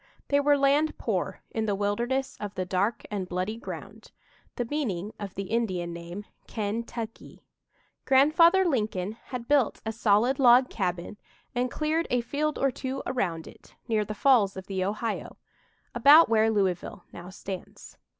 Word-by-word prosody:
They 285 - +4
were 290 0 +4
"land 285 +3 +2
poor" - - -2
in 220 -1 -2
the 205 - +1
wilderness 235 +7 -1
of 205 -1 -6
the 185 - -2
"Dark 200 +5 -1
and 190 -3 -3
Bloody 185 +4 -2
Ground" 235 - -9 0.5
the 245 - -2
meaning 220 - -3
of 200 -3 -7
the 195 - -3
Indian 185 -6 -2
name, 170 +4 -8 0.2
"Ken 215 +1 -2
tuc 230 -1 -6
kee." - - -16 0.6
Grandfather 335 +8 +5
Lincoln 210 - -1
had 245 -2 -6
built 280 -5 +2
a 220 - -1
solid 225 +4 +2
log 250 0 +6
cabin 180 0 -3 0.4
and 250 0 0
cleared 315 +5 -1
a 245 0 +1
field 295 +5 -2
or 275 0 +2
two 265 +2 -5
around 170 -10 -2
it, - - -16
near 220 -3 +1
the 210 +1 -6
Falls 215 -6 +3
of 190 - -7
the 190 -1 -2
Ohio, 210 +4 -3 0.6
about 285 +5 +7
where 220 0 +4
Louisville 195 -2 -1
now 175 +1 -9
stands. 190 0 -9
225 Hz, 160 wpm, -27 LUFS, 195-265 Hz, 0.6 s, about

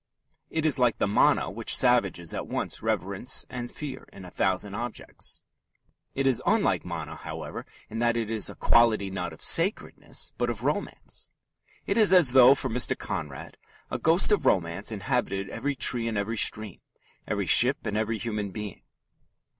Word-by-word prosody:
It 160 -1 -2
is 145 -3 +4
like 120 -2 +2
the - - +1
"mana" 100 - +2
which - - -1
savages 100 -10 +1
at - - -5
once - - -4
reverence - - -2
and 120 -1 -5
fear 140 -3 -8
in 95 - -12
a 90 - -11
thousand 95 +1 -1
objects. 120 +2 -6 0.7
It 135 - -1
is 130 -3 +2
unlike - - +1
"mana," - - -6
however, - - -7 0.2
in 115 - -6
that 120 0 +1
it 115 -1 -2
is 110 -3 0
a - - -9
quality 110 -5 +3
not 90 -2 -4
of 80 - -11
sacredness, 180 +6 +1
but - - 0
of - - -5
romance. - - -4 0.6
It 200 +3 0
is 210 -4 +5
as 175 -9 +6
though 130 +1 +7
for 135 - -3
Mr. 125 0 +1
Conrad 75 -4 -6 0.3
a - - -2
ghost 170 +6 +2
of 200 -7 +2
romance 90 +2 0
inhabited 100 -3 -2
every 145 0 -3
tree 120 -3 +1
and 110 -2 -2
every 100 +3 -2
stream, 105 -1 0 0.5
every - - -1
ship 130 +4 +5
and 105 -2 -2
every 110 +1 -1
human 105 -2 -3
being. 105 -1 -7
115 Hz, 170 wpm, -27 LUFS, 100-130 Hz, 0.7 s, though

